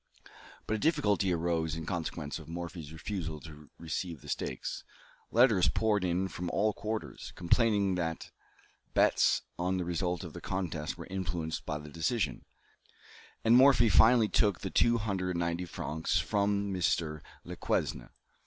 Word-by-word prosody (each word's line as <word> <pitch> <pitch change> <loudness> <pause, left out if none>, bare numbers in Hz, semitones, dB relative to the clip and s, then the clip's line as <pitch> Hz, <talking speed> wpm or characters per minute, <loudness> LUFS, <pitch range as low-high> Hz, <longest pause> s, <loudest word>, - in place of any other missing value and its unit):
But - - -2
a 110 - 0
difficulty 105 - +2
arose 80 -2 0
in 80 -1 -5
consequence 80 -4 -4
of - - -12
Morphy's 85 -2 -6
refusal 80 -2 -4
to 75 -1 -12
receive 85 -1 -4
the - - -11
stakes. - - -3 0.5
Letters 115 -6 +5
poured 105 -3 +1
in 90 +1 0
from 90 -2 -5
all 105 +5 +1
quarters, 110 +1 -5
complaining 100 +1 +2
that 80 -2 -3 0.6
bets - - +4 0.2
on 90 +1 0
the 90 - -2
result 90 0 -1
of - - -8
the - - -8
contest 85 -5 -3
were 85 - -8
influenced 85 -4 -3
by 75 - -1
the 75 0 -10
decision, 80 - -1 1.0
and 115 +1 +6
Morphy 130 -3 +6
finally 115 +1 +6
took 105 -3 +2
the 95 - -4
two 120 0 +4
hundred 100 -4 -2
and - - -1
ninety 85 +1 -1
francs 80 -1 -2
from 100 -1 0
Mr. 80 -4 0 0.2
Lequesne. - - -2
90 Hz, 150 wpm, -31 LUFS, 80-105 Hz, 1.0 s, and